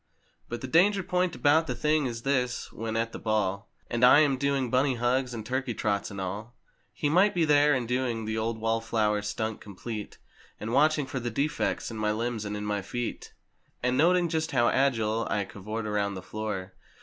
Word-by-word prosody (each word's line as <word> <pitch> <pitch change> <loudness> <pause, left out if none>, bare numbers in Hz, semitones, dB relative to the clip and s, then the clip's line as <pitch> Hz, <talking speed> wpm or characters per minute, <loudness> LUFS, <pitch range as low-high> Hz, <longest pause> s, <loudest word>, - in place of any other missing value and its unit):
But 120 - -5
the 130 - -4
danger 190 +7 +4
point 180 -2 0
about 145 +6 +3
the 125 - -2
thing 150 +3 +1
is 115 -1 -5
this: 125 -3 -1
when 110 0 -3
at 115 0 -1
the - - -7
ball 105 -2 -1 0.2
And 120 +1 -2
I 125 +4 +8
am 145 -3 +3
doing 135 -2 0
"Bunny 130 +1 +2
hugs" 125 +2 0
and 110 -3 -6
"Turkey 130 0 -2
trots" 100 -1 -1
and 100 -2 -7
all. 105 +6 -5 0.4
He 150 - -2
might 185 +7 +4
be 170 -2 +3
there, 145 -1 +5
and 125 -2 -2
doing 125 -2 -1
the 110 0 -2
old 110 +1 -1
wall 115 +1 0
flower 110 -2 +1
stunt 110 +1 -3
complete. 105 +2 -7 0.4
And 110 +2 -4
watching 150 +1 +3
for 135 - -4
the 120 -1 -3
defects 140 +1 -1
in 110 - -6
my 105 0 0
limbs 115 -1 -2
and 105 0 -3
in 105 - -5
my 105 -1 -1
feet, 120 +5 -5 0.5
And 125 +1 +2
noting 175 +5 +4
just 160 -1 -2
how 120 -2 +4
agile 115 -5 +1
I 100 0 0
cavort 105 +3 -6
around 100 -1 -1
the 95 - -7
floor. 100 -3 -5
120 Hz, 205 wpm, -28 LUFS, 110-140 Hz, 0.5 s, I